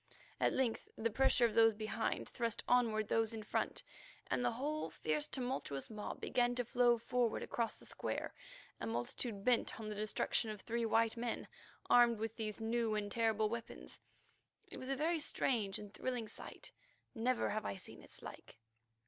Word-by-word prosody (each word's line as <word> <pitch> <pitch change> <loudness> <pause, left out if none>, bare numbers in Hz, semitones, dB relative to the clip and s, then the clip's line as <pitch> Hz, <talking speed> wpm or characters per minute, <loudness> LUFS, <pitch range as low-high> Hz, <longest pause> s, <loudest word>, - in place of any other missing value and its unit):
At - - +3
length 250 -4 0
the 230 +1 0
pressure 250 +1 +5
of 225 - +1
those 225 -1 +6
behind 215 0 -1
thrust 230 -3 -2
onward 225 -4 +3
those 225 0 +2
in 220 - -5
front, 210 - -1 0.5
and - - +2
the 245 -1 +2
whole 285 - -2
fierce, 155 -2 -1
tumultuous 245 - -2
mob 210 -1 -5
began 245 -1 +2
to 245 -1 0
flow 240 0 +4
forward 235 0 0
across 230 -2 -1
the - - -16
square, - - -3 0.5
a 115 - -3
multitude 195 - -2
bent 245 -2 +2
on 215 -1 -4
the - - -2
destruction 215 +2 0
of 210 -2 -5
three 230 +2 -1
white 225 +1 +3
men, 235 0 -2 0.4
armed 240 -1 +6
with 225 +1 -3
these 215 -2 -4
new 225 0 +1
and 205 -1 -2
terrible 220 -1 +2
weapons. 230 +1 -6 0.7
It - - -6
was 260 - -6
a 275 - +1
very 320 +4 +1
strange 225 -9 0
and 205 -1 -9
thrilling 245 -2 -2
sight; - - -7 0.4
never 250 +1 +1
have 215 +1 -1
I 100 - -2
seen - - -7
its - - -12
like. - - -10
225 Hz, 175 wpm, -37 LUFS, 215-245 Hz, 0.7 s, those